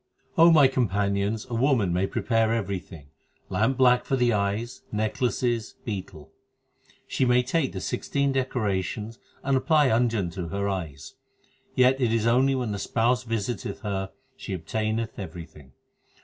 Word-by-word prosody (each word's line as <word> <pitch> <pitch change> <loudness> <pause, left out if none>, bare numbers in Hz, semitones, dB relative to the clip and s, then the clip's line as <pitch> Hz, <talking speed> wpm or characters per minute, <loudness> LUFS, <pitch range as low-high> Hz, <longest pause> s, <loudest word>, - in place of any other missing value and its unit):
3 165 - +7
O 170 - +8
my 150 -4 +7
companions, 105 -4 0
a 120 - -7
woman 115 -7 +2
may 95 +2 +1
prepare 115 +1 +1
everything 95 -9 -4 0.4
lamp 120 +4 +1
black 125 -1 +4
for 135 - 0
the 125 -2 +2
eyes, 105 +4 -2
necklaces, 115 +1 -1
betel; 95 - -6 0.7
She - - -1
may 125 0 +4
take 135 +1 0
the 95 - -6
sixteen 140 +7 -1
decorations 110 -4 -2 0.2
and 135 0 +1
apply 150 +1 +3
anjan 110 -6 +1
to 90 -2 -5
her 100 +4 -2
eyes; 80 -8 -5 0.6
Yet 130 +1 +4
it 120 -3 +2
is 115 -1 +1
only 130 +3 +3
when 125 -4 -2
the 100 - -3
spouse 120 +4 +1
visiteth 115 -1 -3
her 95 -2 -3 0.3
she 100 - -6
obtaineth 110 +6 -2
everything. 80 -7 -9
110 Hz, 150 wpm, -26 LUFS, 100-125 Hz, 0.7 s, O